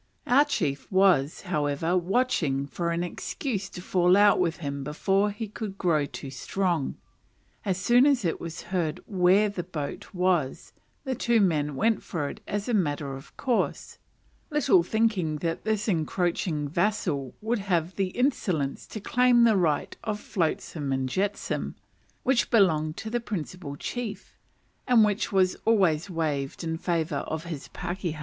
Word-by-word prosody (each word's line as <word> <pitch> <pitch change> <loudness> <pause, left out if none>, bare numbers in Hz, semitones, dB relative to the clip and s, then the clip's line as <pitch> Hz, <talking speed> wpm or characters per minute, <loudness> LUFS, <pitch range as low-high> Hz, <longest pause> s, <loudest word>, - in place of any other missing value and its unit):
Our 275 +4 +5
chief 145 - -2
was, 185 -7 +3
however, 160 -1 0
watching 175 - +1
for 170 +4 -3
an 170 +1 0
excuse 195 - -4
to 180 - -9
fall 180 0 +4
out 205 0 +6
with 170 -2 +1
him 140 -3 -4
before 195 +8 +1
he 210 +2 -5
should 205 -4 -5
grow 155 -6 +1
too 135 -2 -8
strong. 170 +2 -1 0.7
As 190 -3 0
soon 240 +8 +5
as 265 -8 +2
it 165 - -1
was 165 -1 -6
heard 165 -5 0
where 190 +1 +4
the 200 -3 -3
boat 155 -5 -6
was, 180 -7 0 0.3
the 265 -2 -2
two 235 -1 +2
men 150 -7 +1
went 220 +7 +2
for 150 -6 -3
it - - -9
as 205 +2 -3
a 245 - 0
matter 145 -8 0
of 135 +2 -11
course; 250 -4 -1 0.5
little 295 - +4
thinking 195 -5 +1
that 165 +4 -3
this 215 -1 0
encroaching 170 -3 0
vassal 165 - -1
would 225 +2 -1
have 180 -3 -1
the 195 -1 0
insolence 185 - -1
to 215 - -6
claim 245 +3 +4
the 225 -2 +5
right 165 -6 +1
of 210 -2 -2
"flotsam 160 -6 -2
and 130 -1 0
jetsam," 200 +7 -2 0.5
which 260 -2 +2
belonged 160 -8 +3
to 220 +1 -5
the 240 - +1
principal 180 -8 -5
chief, 225 - -5 0.5
and 240 -4 +6
which 210 0 -1
was 190 -2 +3
always 190 -7 +3
waived 150 -4 -2
in 160 -1 -2
favour 165 -1 -1
of 160 0 -4
his 160 -5 -6
pakehas. 175 -3 -4
180 Hz, 155 wpm, -27 LUFS, 155-210 Hz, 0.7 s, out